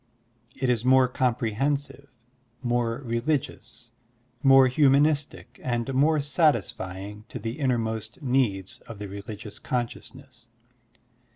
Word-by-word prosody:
It 130 - -1
is 120 -2 +1
more 130 0 +5
comprehen 125 +2 0
sive, 140 0 -13 0.6
more 120 +1 -1
religious, 120 -1 -3 0.5
more 135 -1 +7
htimanistic, 145 +2 +2 0.2
and 120 +1 -2
more 150 +4 +3
satisfying 105 - -1
to - - -6
the 115 +5 -5
innermost 115 -4 -2
needs 120 -8 0
of 115 - -8
the 105 0 -6
religious 100 +1 -8
consciousness. 125 0 -5
125 Hz, 105 wpm, -26 LUFS, 115-135 Hz, 0.6 s, more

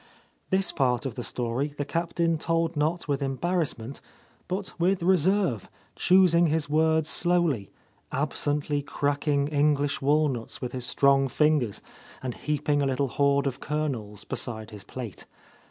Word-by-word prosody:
This 190 +1 +1
part 125 -2 +1
of 130 - -3
the 125 - -5
story 125 +6 -2
the 145 - -2
Captain 165 0 0
told 165 +1 0
not 160 +4 -1
with 140 -1 -1
embarrassment, 140 -3 -2 0.5
but 185 +2 -4
with 180 +1 +2
reserve, 185 - +2 0.3
choosing 175 -2 +5
his 155 -1 0
words 160 +1 +2
slowly, 170 - +2 0.4
absently 145 +1 -1
cracking 145 0 0
Eng 150 0 +3
lish 140 0 -2
walnuts 140 -4 +1
with 125 - -4
his 125 -1 -3
strong 135 -1 +3
fingers 145 -5 +1 0.4
and 125 -2 -3
heaping 150 +1 -1
a 140 - +1
little 135 +1 0
hoard 140 +2 +2
of 135 -2 -2
kernels 130 -9 -3
beside 110 -3 -4
his 105 -2 -10
plate. 120 -6 -8
145 Hz, 140 wpm, -27 LUFS, 135-165 Hz, 0.5 s, choosing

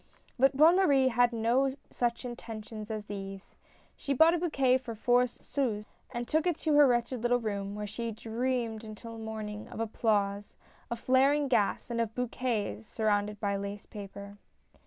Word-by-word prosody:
But 270 +1 +4
Bonne 325 +5 +7
Marie 275 -8 +4
had 245 0 +3
no 245 +4 +1 0.2
such 240 +1 -1
intuitions 220 -2 -7
as 215 -1 -4
these. 195 -1 -7 0.4
She 280 -1 -2
bought 320 +5 +6
a 350 - +1
bouquet 275 -7 +2
for 235 -3 -7
four 245 +3 +3
sous, 235 -4 -3 0.2
and 240 0 -4
took 315 +3 +1
it 345 -3 +1
to 310 - +3
her 290 -1 +7
wretched 240 0 0
little 245 +1 +2
room, 200 -3 -3
where 210 0 -4
she 230 +3 -4
dreamed 230 0 -2
until 225 +1 -9
morning 215 -1 -6
of - - -9
applause, 205 -2 0 0.3
of 235 - -3
flaring 275 +4 +3
gas, 235 -1 +1
and 235 0 0
of 225 0 -3
bouquets 230 - -2
surrounded 210 -1 0
by 200 -1 0
lace 200 +1 -5
paper. 200 0 -9
230 Hz, 165 wpm, -30 LUFS, 210-255 Hz, 0.4 s, Bonne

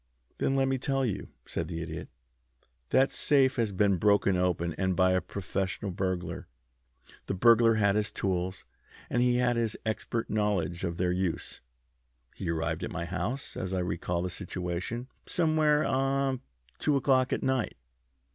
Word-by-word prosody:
"Then 135 - +1
let 135 0 +3
me 135 -1 0
tell 135 0 0
you," 110 - -3 0.2
said - - -3
the 85 - -4
Idiot. 80 -1 -6 0.8
"That 135 +1 +4
safe 135 -3 +3
has 115 -3 +1
been 100 0 +2
broken 100 0 +3
open, 90 -2 0
and 95 -1 0
by 95 0 +4
a 95 0 +2
professional 100 +1 -3
burglar. 90 -2 -3 0.8
The 95 - -1
burglar 115 +2 +6
had 100 -2 +3
his 105 -1 0
tools, 95 -1 -2 0.5
and 120 - +2
he 125 0 +3
had 125 -1 +2
his 115 -2 0
expert 110 +1 -2
knowledge 100 -5 0
of 85 -2 -2
their 90 -1 +1
use. 90 -2 -2 0.7
He - - -5
arrived 80 +1 -1
at - - -2
my 85 - -4
house, 110 +9 -3
as 95 0 -3
I - - 0
recall 90 -1 -2
the 90 - -2
situation, 90 +5 -4 0.2
somewhere 155 -3 +3
about - - 0
ah 135 0 +1 0.4
two 150 - +2
o'clock 130 -2 +3
at - - -1
night. 130 -3 0
100 Hz, 165 wpm, -29 LUFS, 90-125 Hz, 0.8 s, burglar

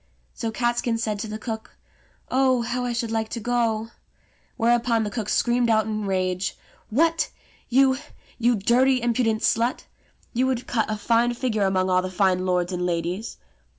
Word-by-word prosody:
So 230 - -3
Catskin 240 0 0
said 215 -2 -2
to 220 - -4
the 215 0 -5
cook, 220 0 -6 0.5
"Oh, 260 -2 +3
how 245 +1 -2
I 245 - -1
should 235 -1 -2
like 220 -1 -1
to 235 - -4
go!" 225 -1 0 0.7
Whereupon 235 -1 +2
the 210 - -3
cook 220 -3 -3
screamed 240 0 +2
out 220 -2 +3
in 215 -1 -3
a - - -3
rage, 185 -1 -1 0.3
"What, 325 +6 +2 0.4
you, 265 +1 +4 0.4
you 240 +1 +3
dirty, 250 +5 +3
impudent 230 -2 0
slut! 235 +3 +1 0.5
You 255 +2 +2
would 255 -2 -1
cut 225 -3 0
a 215 - -1
fine 235 +3 +2
figure 220 -5 0
among 185 -1 +1
all 185 0 +4
the 185 - -4
fine 185 0 +1
lords 180 0 0
and 180 0 -2
ladies." 175 +4 -2
225 Hz, 175 wpm, -24 LUFS, 205-240 Hz, 0.7 s, you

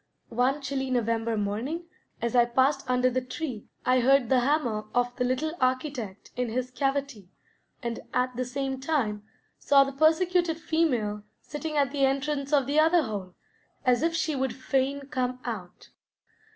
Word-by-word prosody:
One 255 +5 +1
chilly 270 -1 -2
November 230 -2 0
morning, 230 +12 -2 0.4
as 235 +1 0
I 240 -1 +6
passed 260 +3 +1
under 250 0 +3
the 255 0 0
tree, 255 -3 -5 0.2
I 255 0 +4
heard 260 -1 +4
the 260 - +5
hammer 245 -5 0
of 245 0 +1
the 250 - -1
little 255 +6 0
architect 255 -6 -2
in 250 -1 -1
his 250 +2 -2
cavity, 270 -6 -2 0.5
and 235 -1 -3
at 250 0 0
the 255 - -1
same 265 +1 -3
time 260 -8 -1 0.4
saw 275 -1 +5
the 275 - -4
persecuted 325 +3 +2
female 250 -11 0 0.2
sitting 305 +1 -5
at 280 -2 +2
the 280 -1 0
entrance 275 +1 0
of 285 -3 +4
the 290 +3 +2
other 325 +1 +5
hole 200 -6 -5 0.5
as 250 -1 +4
if 330 +1 +1
she 320 -2 0
would 265 -1 -1
fain 270 +1 0
come 255 -3 -2
out. 200 -7 -6
260 Hz, 165 wpm, -27 LUFS, 240-285 Hz, 0.5 s, I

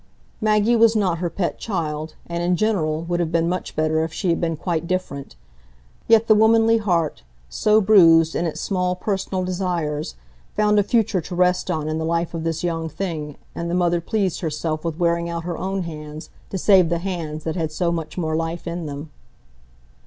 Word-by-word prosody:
Maggie 215 +2 +3
was 230 0 +5
not 185 -6 +1
her 175 -1 -1
pet 175 0 -2
child, 155 -6 -3
and, 170 0 -4
in 175 +1 +2
general, 165 -7 0
would 175 +1 -2
have 165 -2 -1
been 165 0 +2
much 180 +1 -3
better 155 0 +1
if 160 - -3
she 185 +3 -2
had 165 - -1
been 165 -2 -1
quite 170 0 -2
different; 175 -7 -3 0.7
yet 225 0 +5
the 220 - +6
womanly 225 +1 +4
heart, 170 -7 0 0.3
so 210 - +3
bruised 165 -6 +6
in 170 - 0
its 160 - -5
small 180 -2 0
personal 190 -1 -2
desires, 175 - -2 0.4
found 210 0 +3
a - - +6
future 215 -4 +1
to 175 +3 -7
rest 180 +1 +2
on 155 -4 -1
in 155 +1 -2
the - - -2
life 170 +1 -1
of 165 -1 -4
this 165 0 -2
young 165 -2 -2
thing, 155 -5 -5 0.2
and 170 0 -4
the 175 - 0
mother 175 -1 +2
pleased 195 0 -1
herself 155 -1 -2
with 165 -2 -3
wearing 170 -1 +1
out 170 -1 -4
her 175 -1 -4
own 190 0 -2
hands 155 -1 -8 0.2
to 195 - -3
save 185 -2 +5
the 170 - +1
hands 165 -4 -4
that 160 - -3
had 160 -3 -2
so 170 +2 0
much 165 -1 -4
more 160 -3 -1
life 165 +1 -3
in 170 -2 -4
them. 145 +2 -7
170 Hz, 200 wpm, -22 LUFS, 160-190 Hz, 0.7 s, the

